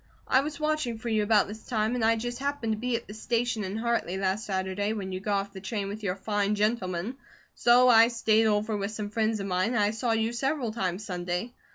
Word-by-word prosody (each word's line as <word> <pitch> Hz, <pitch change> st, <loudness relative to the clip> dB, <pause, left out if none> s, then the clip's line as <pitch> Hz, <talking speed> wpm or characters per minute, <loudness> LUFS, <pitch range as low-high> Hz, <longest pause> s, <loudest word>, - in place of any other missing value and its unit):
I 260 Hz, -, +4 dB
was 295 Hz, +1 st, -5 dB
watching 305 Hz, -6 st, -1 dB
for 235 Hz, +1 st, -5 dB
you 220 Hz, -1 st, +2 dB
about 210 Hz, -1 st, +3 dB
this 215 Hz, +2 st, -9 dB
time, 220 Hz, -1 st, 0 dB
and 245 Hz, -2 st, -1 dB
I 225 Hz, +1 st, +4 dB
just 240 Hz, +2 st, -4 dB
happened 280 Hz, -5 st, -2 dB
to -, -, -3 dB
be 245 Hz, +1 st, -1 dB
at 230 Hz, -, -4 dB
the 210 Hz, -, -8 dB
station 230 Hz, 0 st, -1 dB
in 195 Hz, +2 st, -4 dB
Hartley 230 Hz, -5 st, -1 dB
last 195 Hz, +3 st, -1 dB
Saturday 190 Hz, +2 st, -1 dB
when 195 Hz, -3 st, -4 dB
you 185 Hz, -, -3 dB
got 200 Hz, +1 st, 0 dB
off 200 Hz, 0 st, -10 dB
the 190 Hz, -, -8 dB
train 200 Hz, 0 st, -3 dB
with 210 Hz, +2 st, -6 dB
your 185 Hz, -3 st, -1 dB
fine 205 Hz, +1 st, 0 dB
gentleman, 210 Hz, +1 st, -1 dB, 0.4 s
so 245 Hz, +1 st, +5 dB
I 230 Hz, -2 st, +8 dB
stayed 225 Hz, -2 st, +2 dB
over 215 Hz, +1 st, +1 dB
with 200 Hz, -1 st, -2 dB
some 210 Hz, -1 st, -5 dB
friends 220 Hz, 0 st, 0 dB
of 195 Hz, -, -3 dB
mine, 185 Hz, +5 st, 0 dB
and -, -, +2 dB
I 205 Hz, -, +2 dB
saw 225 Hz, +2 st, -1 dB
you 225 Hz, +1 st, 0 dB
several 265 Hz, -1 st, -1 dB
times 190 Hz, -2 st, -2 dB
Sunday. 180 Hz, +4 st, -3 dB
220 Hz, 240 wpm, -28 LUFS, 200-235 Hz, 0.4 s, I